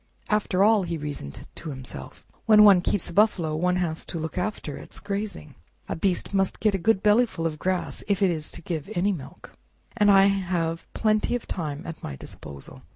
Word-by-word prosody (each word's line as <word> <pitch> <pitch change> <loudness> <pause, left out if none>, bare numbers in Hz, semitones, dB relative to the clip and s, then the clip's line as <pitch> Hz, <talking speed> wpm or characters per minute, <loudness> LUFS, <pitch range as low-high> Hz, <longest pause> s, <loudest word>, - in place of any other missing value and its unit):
"After 205 -3 +2
all," 215 0 +5
he 170 -2 -3
reasoned 145 - -7
to 165 - -8
himself, 130 - -9 0.2
"when 215 -1 +8
one 195 -4 +8
keeps 185 +1 -1
a - - -10
buffalo 175 -6 +2
one 180 +3 +1
has 170 -3 -1
to - - -4
look 160 0 -4
after 180 -6 -3
its - - -9
grazing. 200 - -5 0.3
A - - -3
beast 185 +3 -1
must 195 -1 +1
get 215 -2 +2
a 195 - 0
good 210 +2 +2
bellyful 210 -5 +3
of 155 -2 -2
grass 185 +1 -2
if 200 -1 +1
it 190 - +4
is 155 -2 -4
to 170 - -7
give 160 -1 -4
any 190 +4 +2
milk, 155 -9 -8 0.4
and 210 -3 +4
I 195 -1 +7
have 180 -4 0
plenty 215 +2 +1
of 245 - -5
time 150 -3 -4
at 165 -2 -7
my 70 - -6
disposal." 70 +1 -9
180 Hz, 200 wpm, -25 LUFS, 160-205 Hz, 0.4 s, when